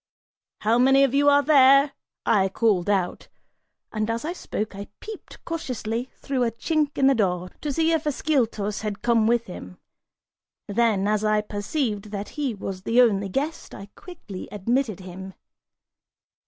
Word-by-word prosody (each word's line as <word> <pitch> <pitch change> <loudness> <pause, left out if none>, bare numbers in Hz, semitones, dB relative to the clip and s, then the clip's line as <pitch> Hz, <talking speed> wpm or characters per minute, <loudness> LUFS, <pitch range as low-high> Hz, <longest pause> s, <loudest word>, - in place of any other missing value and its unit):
"How 225 +3 +2
many 270 +2 +5
of 275 -2 +2
you 285 +1 +4
are 285 0 +5
there?" 275 -1 +6 0.3
I 195 -3 +3
called 200 -3 +1
out, 190 -3 -1 0.7
and 215 0 -1
as 230 +4 -2
I 340 - -2
spoke, 215 - -5
I 200 0 -7
peeped 435 -2 -10
cautiously 250 -7 -3
through 265 -3 -2
a 235 - +2
chink 295 +5 -1
in 270 - +3
the 270 - +6
door 180 -6 -1
to 295 - -2
see 325 +3 +1
if 320 -2 0
Ascyltos 235 -8 0
had 210 -1 -5
come 230 -2 +3
with 235 0 +2
him; 90 - -10 0.9
then, 205 -2 +1
as 210 0 +1
I 215 0 +2
perceived 210 +1 -3
that 205 0 -5
he 280 -6 -3
was 195 -1 -6
the 230 +5 +1
only 200 -5 +3
guest, 290 - -3
I 200 0 -10
quickly 275 - -9
admitted 215 0 -1
him. 190 +1 -9
230 Hz, 160 wpm, -24 LUFS, 200-275 Hz, 0.9 s, there